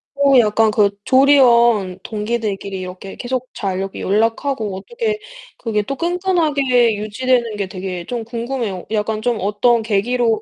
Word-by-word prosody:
어, 280 -2 +4
약간 215 0 +3
그 205 -1 +3
조리원 240 -8 +4
동기들끼리 210 -3 -3
이렇게 185 +1 -8
계속 255 0 -3
잘 190 -3 -3
이렇게 195 0 -5
연락하고 225 +1 0
어떻게 435 - -3 0.4
그게 215 -3 -1
또 275 +7 -4
끈끈하게 300 - +1
유지되는 230 +2 0
게 200 -2 -3
되게 185 -2 -6
좀 240 +1 -4
궁금해요. 230 -4 -4
약간 215 0 -1
좀 240 -1 0
어떤 210 +4 +2
계기로 225 +1 +1
225 Hz, 315 characters per minute, -19 LUFS, 205-255 Hz, 0.4 s, 어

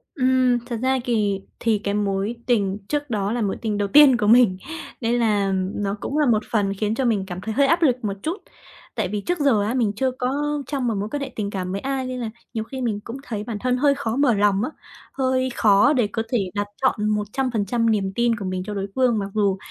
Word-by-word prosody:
Ừm, 255 -3 +3
thật 245 -1 -4
ra 260 0 +2
kì 210 -5 0 0.2
thì 225 -2 +2
cái 200 - -1
mối 205 +2 -1
tình 200 -5 +1
trước 290 -1 -2
đó 205 -3 -1
là 240 +1 -1
mối 200 -3 -1
tình 215 -2 -1
đầu 205 0 0
tiên 275 +2 +7
của 210 - 0
mình 225 -4 +5 0.4
nên 235 +1 +1
là, 210 -4 +2
ừm, 190 +1 -2
nó 200 0 -1
cũng 290 - -3
là 300 - +3
một 225 -4 +2
phần 200 -3 +1
khiến 210 +2 -1
cho 265 - 0
mình 215 -5 +1
cảm 180 -1 -6
thấy 220 +2 -4
hơi 280 +3 +3
áp 335 +3 +2
lực 270 -7 +4
một 200 - -1
chút. 330 +5 -2 0.6
Tại - - 0
vì 205 +2 -3
trước 355 - -2
giờ, 265 -8 +3
á, 215 +3 -1
mình 230 -5 +1
chưa 260 +4 0
có 285 +3 -2
trong 270 -4 -2
một 230 - +1
mối 205 +2 -3
quan 290 - -3
hệ 275 -1 -4
tình 205 -2 -2
cảm 185 -2 -4
với 195 +1 -3
ai 270 -1 -2
nên 255 0 -4
là 235 -2 -3 0.2
nhiều 220 -2 -2
khi 265 +3 -7
mình 220 -4 -1
cũng 235 +4 -7
thấy 215 -6 -4
bản 220 -1 -5
thân 250 +2 0
hơi 280 +1 +3
khó 235 -5 -2
mở 275 -3 +3
lòng, 205 -1 +2
á, 255 - -1 0.4
hơi 260 -1 0
khó 210 +6 +5
để 245 -7 +2
có 225 +2 -3
thể 210 -7 0
đặt 205 0 -2
trọn 215 -5 +1
100% 225 +1 0
niềm 195 -3 0
tin 235 -1 +2
của 205 -3 -6
mình 185 0 -3
cho 210 - -5
đối 195 -1 -3
phương 255 -3 +3
mặc 195 -1 -4
dù 200 -3 +1
225 Hz, 255 wpm, -23 LUFS, 205-260 Hz, 0.6 s, tiên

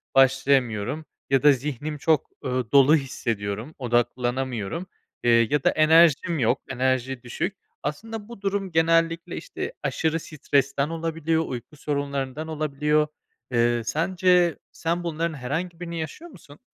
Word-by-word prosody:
başlayamıyorum 135 0 +3 0.2
ya 135 0 +3
da 150 - +8
zihnim 145 +2 -3
çok, 155 0 +1 0.2
ııı, 125 -3 -2
dolu 140 +2 +7
hissediyorum, 115 -3 -3
odaklanamıyorum, 125 - -1 0.4
eee, 115 -1 +5
ya 145 -2 +1
da - - +5
enerjim 160 +1 +4
yok, 115 -3 +2
enerji 130 -1 -1
düşük. 180 - -3 0.3
Aslında 210 +8 -5
bu 235 -4 -11
durum 195 -1 -1
genellikle, 165 0 +2
işte, - - -5
aşırı 160 0 0
stresten 140 -2 0
olabiliyor, 165 -1 -1
uyku 125 +4 -7
sorunlarından 140 0 -3
olabiliyor. 150 -1 +1 0.4
Eee, 120 -1 +2
sence 175 +3 +2
sen 170 +2 -2
bunların 165 0 -2
herhangi 160 +6 -4
birini 170 -1 -5
yaşıyor 305 - -7
musun? 150 - -15
150 Hz, 125 wpm, -25 LUFS, 130-165 Hz, 0.4 s, da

